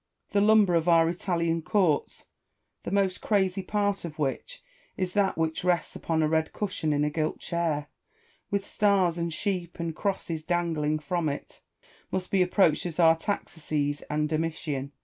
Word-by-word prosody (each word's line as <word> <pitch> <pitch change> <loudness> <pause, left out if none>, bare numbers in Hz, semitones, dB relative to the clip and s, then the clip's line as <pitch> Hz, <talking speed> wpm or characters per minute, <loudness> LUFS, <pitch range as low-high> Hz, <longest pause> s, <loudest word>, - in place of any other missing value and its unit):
Tlio 200 0 +4
lumber 210 -3 +5
of 165 0 +2
our 165 -1 +5
Italian 170 -1 -1
courts, 170 -3 0 0.6
the - - -5
most 195 -1 +1
crazy 195 -2 +1
part 205 0 -1
of 160 -3 -7
which 155 - -3 0.3
is 185 -1 -2
that 200 -4 +1
which 160 0 -1
rests 180 -1 0
upon 160 -1 0
a - - +3
red 160 0 +1
cushion 185 -6 -2
in 145 0 +1
a 150 - 0
gilt 155 0 -1
chair, 165 -4 -1 0.6
with 200 0 -1
stars 190 -6 +2
and 170 0 -1
sheep 180 -1 -3
and 165 -1 -3
crosses 175 -5 -2
dangling 160 -3 0
from 155 +1 -1
it, 140 - -7 0.5
must 185 -1 -3
be 195 - +3
approached 180 -3 +3
as 170 0 -7
Artaxerxes 160 -4 +1
and 150 0 0
Domitian. 155 -3 -2
170 Hz, 160 wpm, -27 LUFS, 155-190 Hz, 0.6 s, lumber